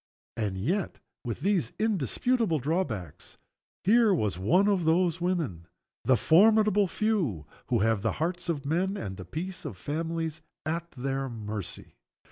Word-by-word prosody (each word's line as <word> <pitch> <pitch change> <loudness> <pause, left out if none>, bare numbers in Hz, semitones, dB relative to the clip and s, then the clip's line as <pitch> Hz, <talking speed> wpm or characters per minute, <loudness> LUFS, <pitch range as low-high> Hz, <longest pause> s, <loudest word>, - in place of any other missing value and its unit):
And 105 -4 -2
yet, 170 - -1 0.3
with 115 -3 -4
these 185 - +1
indisputable 220 - +1
drawbacks, 130 - -3 0.5
here 225 +2 +5
was 105 - -1
one 180 - +3
of 195 -4 +2
those 170 +1 +2
women 155 - -1 0.4
the 130 -2 +5
formidable 210 - +5
few 170 - 0 0.2
who 120 -4 +1
have 110 -1 +2
the 115 - 0
hearts 175 +3 -2
of 145 -4 -2
men 185 +7 0
and 95 - -5
the 95 -1 -9
peace 175 - -5
of 95 - -6
families 160 - -3 0.2
at 170 +2 -2
their 135 +1 -2
mercy. 105 -4 -7
160 Hz, 140 wpm, -28 LUFS, 115-185 Hz, 0.5 s, here